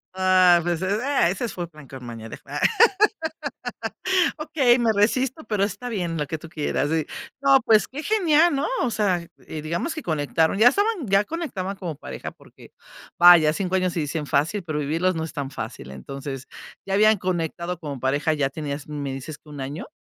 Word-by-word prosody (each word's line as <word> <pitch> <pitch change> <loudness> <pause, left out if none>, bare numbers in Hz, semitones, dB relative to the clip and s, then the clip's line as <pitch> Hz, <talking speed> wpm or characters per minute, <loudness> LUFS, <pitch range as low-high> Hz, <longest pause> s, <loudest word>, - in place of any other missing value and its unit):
Ah, 185 -2 +5
pues, 175 -1 -1
es, 200 +3 0
ah, 275 -9 +2
ese 215 +6 -3
fue 175 -2 -5
plan 150 -4 -15
con 130 0 -10
maña 115 -1 -8
de - - -8
fans. - - -7 1.8
"Okey, 295 -6 +2
me 230 -2 +2
resisto, 255 +8 +1
pero 210 -6 0
está 245 +4 -6
bien, 175 -7 -2
lo 150 - -1
que 160 +3 -4
tú 165 - -11
quieras". 150 -3 -1
Y, 160 -1 0 0.4
no, 275 -1 +6
pues 215 -1 +4
qué 280 +3 -6
genial, 340 -5 +3
¿no? 275 +2 0 0.2
O 255 - +1
sea, 190 -6 0 0.2
eh, 155 - -6
digamos 170 - -2
que 315 - -6
conectaron, 160 - 0
ya 225 +4 +7
estaban 405 - 0
ya 200 0 +3
conectaban 220 - -4
como 175 -5 -5
pareja - - -7
porque - - -18 0.5
vaya, 175 -3 +8
5 185 +3 -2
años 185 -1 +1
se 170 - -3
dicen 150 0 -2
fácil, 155 +9 0
pero 155 -3 -3
vivirlos 165 +5 0
no 160 0 -2
es 160 - -9
tan 140 -2 -4
fácil. 65 - -7
Entonces 135 - -7 0.4
ya 195 - -2
habían 215 +2 +5
conectado 175 -1 -3
como 145 -5 -6
pareja, 140 +5 +1
ya 145 -3 0
tenías, 145 0 -5
me 145 -2 -4
dices 135 +3 -7
que 150 - -20
¿1 145 -2 -9
año? 140 +5 -5
175 Hz, 195 wpm, -24 LUFS, 150-215 Hz, 1.8 s, vaya